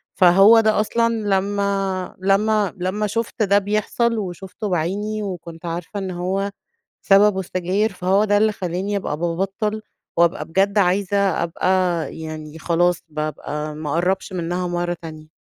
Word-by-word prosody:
فهو 195 +5 +7
ده 220 -1 +3
أصلًا 230 +2 +1
لما 200 -2 -1
لما 200 +1 +2
لما 185 +4 -1
شُفت 230 +1 -2
ده 200 0 +4
بيحصل، 215 +3 0
وشُفته 195 +1 -5
بعيني 200 +5 -1
وكنت 175 -3 -7
عارفة 170 +4 -4
إن 190 -1 -4
هو 190 +3 -2 0.5
سببه 200 0 +5
السجاير، 190 +4 -1
فهو 190 +3 +2
ده 205 -1 +3
اللي 215 +1 +3
خلاني 190 +1 -3
أبقى 150 -6 -3
بابطل، 195 +6 -2 0.4
وأبقى 170 +1 +2
بجد 195 +5 +1
عايزة 195 +1 +2 0.3
أبقى 170 +2 -2 0.5
يعني، 155 -1 -7
خلاص 175 +1 +1
بابقى 150 0 -4
ما 150 -1 -5
أقربش 185 +5 0
منها 180 +1 -2
مرة 175 0 -1
تانية. 155 -2 -9
190 Hz, 135 wpm, -21 LUFS, 175-205 Hz, 0.5 s, فهو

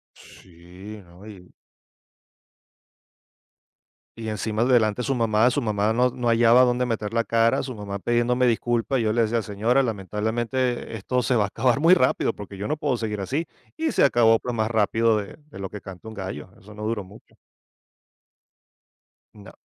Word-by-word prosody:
Sí, 90 +4 -13
no 85 +3 -17
y 95 -4 -13 2.7
Y 110 -1 -6
encima 110 +1 -2
delante 120 -3 +2
de - - -4
su 135 - 0
mamá, 115 0 +3
su 135 - -1
mamá 105 -3 0
no 125 +2 +2
no 125 -1 -4
hallaba 115 +1 +5
dónde 125 0 +1
meter 110 -3 -3
la 115 - +2
cara. 115 +1 +2
Su 130 -2 -6
mamá 100 -2 -6
pidiéndome 120 +4 +1
disculpas, 120 +2 0
yo 110 -1 +1
le 115 +1 +2
decía: 115 +1 0
"Señora, 110 +6 +1
lamentablemente, 115 +3 -2
esto 125 +4 -1
se 125 - +1
va 105 -3 +3
a - - -4
acabar 120 +5 +1
muy 170 +4 +6
rápido 130 -5 +1
porque 100 -1 -10
yo 100 +2 -5
no 150 +1 -2
puedo 130 - -1
seguir 105 -3 -4
así". 145 - -2 0.3
Y 320 -1 -1
se - - +2
acabó, 115 -4 +4
pues, 125 - -4
más 110 -1 -1
rápido 110 0 +2
de 100 +6 -6
de - - -12
lo 95 - -5
que 105 0 -9
canta 95 +2 -11
un 110 - -8
gallo. 95 -4 -7
Eso 105 +2 -15
no 105 - -8
duró 110 -2 -2
mucho. 100 +4 -17 2.0
No. 100 -2 -13
115 Hz, 175 wpm, -24 LUFS, 105-120 Hz, 2.7 s, muy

